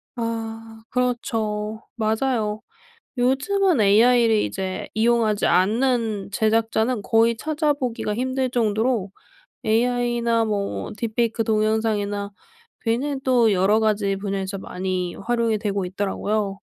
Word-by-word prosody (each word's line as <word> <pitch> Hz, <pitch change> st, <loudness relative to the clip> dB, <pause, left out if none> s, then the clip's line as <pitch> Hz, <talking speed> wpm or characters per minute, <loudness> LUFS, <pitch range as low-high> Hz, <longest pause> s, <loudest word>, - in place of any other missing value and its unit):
아. 225 Hz, -1 st, -5 dB
그렇죠. 220 Hz, -4 st, -2 dB
맞아요. 220 Hz, -1 st, 0 dB, 0.6 s
요즘은 280 Hz, -, +2 dB
AI를 225 Hz, +3 st, +5 dB
이제 190 Hz, -1 st, -4 dB
이용하지 220 Hz, -1 st, +2 dB
않는 220 Hz, 0 st, +1 dB
제작자는 225 Hz, +2 st, +1 dB
거의 230 Hz, +2 st, +3 dB
찾아보기가 280 Hz, -6 st, -1 dB
힘들 260 Hz, +2 st, -1 dB
정도로 220 Hz, -3 st, 0 dB, 0.5 s
AI나 235 Hz, 0 st, +1 dB
뭐 205 Hz, -2 st, -2 dB
딥페이크 225 Hz, 0 st, -1 dB
동영상이나 215 Hz, -2 st, 0 dB, 0.5 s
뷔는 265 Hz, +5 st, -1 dB
또 240 Hz, -4 st, +4 dB
여러 195 Hz, +3 st, +3 dB
가지 210 Hz, -3 st, +1 dB
분야에서 195 Hz, 0 st, -3 dB
많이 185 Hz, -1 st, -3 dB
활용이 230 Hz, 0 st, 0 dB
되고 200 Hz, -2 st, -2 dB
있더라고요. 200 Hz, +2 st, -2 dB
225 Hz, 260 characters per minute, -23 LUFS, 205-240 Hz, 0.6 s, AI를